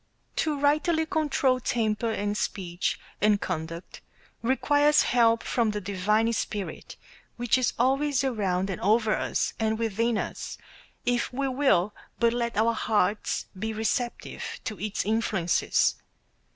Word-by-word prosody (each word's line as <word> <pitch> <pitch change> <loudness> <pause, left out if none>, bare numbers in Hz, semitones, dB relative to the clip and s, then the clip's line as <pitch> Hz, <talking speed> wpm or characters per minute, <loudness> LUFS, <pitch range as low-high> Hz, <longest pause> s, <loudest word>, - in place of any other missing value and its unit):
To 300 -3 0
rightly 305 +3 +2
control 285 -5 +1
temper 225 -2 0
and 205 -1 -1
speech 180 -4 -2 0.2
and 210 0 +4
conduct 165 -1 -5 0.4
requires 290 +4 +3
help 230 -2 +3
from 235 -3 +1
the 210 0 -2
divine 210 +4 +1
Spirit 205 -2 -4 0.4
which 240 -1 +2
is 255 -1 +1
always 270 +2 +2
around 195 -7 0
and 185 - -5
over 215 +2 +3
us, - - -1
and 220 0 +1
within 230 +1 0
us, - - -4 0.5
if 245 -1 0
we 275 +2 -1
will 255 -8 +2 0.3
but 235 -1 +3
let 235 -2 -2
our 230 +2 +3
hearts 210 -2 0
be 220 +2 -2
receptive 225 +3 -2 0.2
to 215 -5 -5
its 205 0 -2
influences. 210 -5 +1
225 Hz, 130 wpm, -27 LUFS, 205-255 Hz, 0.5 s, and